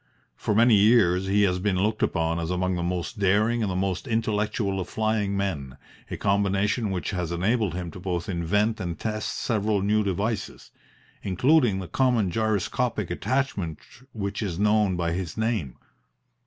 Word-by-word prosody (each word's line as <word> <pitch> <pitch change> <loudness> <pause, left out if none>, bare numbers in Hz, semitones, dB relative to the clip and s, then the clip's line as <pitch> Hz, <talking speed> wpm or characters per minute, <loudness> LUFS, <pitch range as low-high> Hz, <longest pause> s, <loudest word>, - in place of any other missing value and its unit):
For 105 - -1
many 115 +2 +5
years 100 -4 +4
he 100 +1 +3
has 90 -2 +1
been 100 0 0
looked 105 +4 0
upon 85 -1 0
as 85 -1 -3
among 90 +1 0
the 90 - -2
most 90 +5 -3
daring 105 +4 +2
and 105 - 0
the - - -3
most 95 +5 -2
intellectual 105 -3 -1
of 90 - -4
flying 110 -3 0
men, 75 -10 -3 0.3
a - - -4
combination 100 +2 +1
which 95 -1 -3
has 90 -4 -3
enabled 95 +2 0
him 90 -2 -4
to 90 - -10
both 90 -2 -3
invent 105 +5 0
and 85 -3 -4
test 110 -1 -3
several 105 -3 0
new 105 +1 +2
devices, 100 +3 -3 0.5
including 120 - +3
the 95 -2 -5
common 115 -2 +1
gyroscopic 110 -1 -1
attachment 105 - -1 0.3
which 100 -3 -4
is 95 -6 -3
known 105 -1 +2
by 85 -1 -1
his 85 0 -4
name. 110 - -1
100 Hz, 165 wpm, -25 LUFS, 90-110 Hz, 0.5 s, many